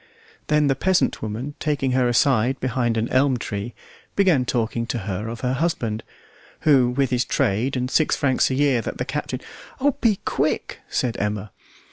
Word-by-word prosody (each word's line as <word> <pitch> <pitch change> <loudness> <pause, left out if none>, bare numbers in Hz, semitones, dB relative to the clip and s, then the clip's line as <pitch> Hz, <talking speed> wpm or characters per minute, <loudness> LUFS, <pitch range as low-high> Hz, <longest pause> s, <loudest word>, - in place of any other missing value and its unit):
Then 150 0 +3
the 140 - +3
peasant 185 +7 +1
woman, 110 +7 -4
taking 145 -4 0
her 125 -1 +2
aside 125 +1 +2
behind 120 -2 0
an 110 +1 0
elm 130 0 +3
tree, 105 0 -5 0.4
began 180 -10 +3
talking 115 -1 -1
to 120 - -2
her 100 0 -4
of 115 0 -6
her 125 0 0
husband, 130 -8 -1 0.6
who 135 -5 +4
with 135 +1 0
his 125 -1 +2
trade 120 +7 0
and 125 - 0
six 155 +4 +2
francs 130 -3 +2
a 130 - -1
year 135 -3 +2
that - - -5
the 125 - -2
captain 130 -2 -4 0.4
"Oh, 285 +2 +3
be 225 -3 +4
quick!" - - -1
said 120 -2 -1
Emma. 105 0 -2
125 Hz, 175 wpm, -23 LUFS, 115-140 Hz, 0.6 s, who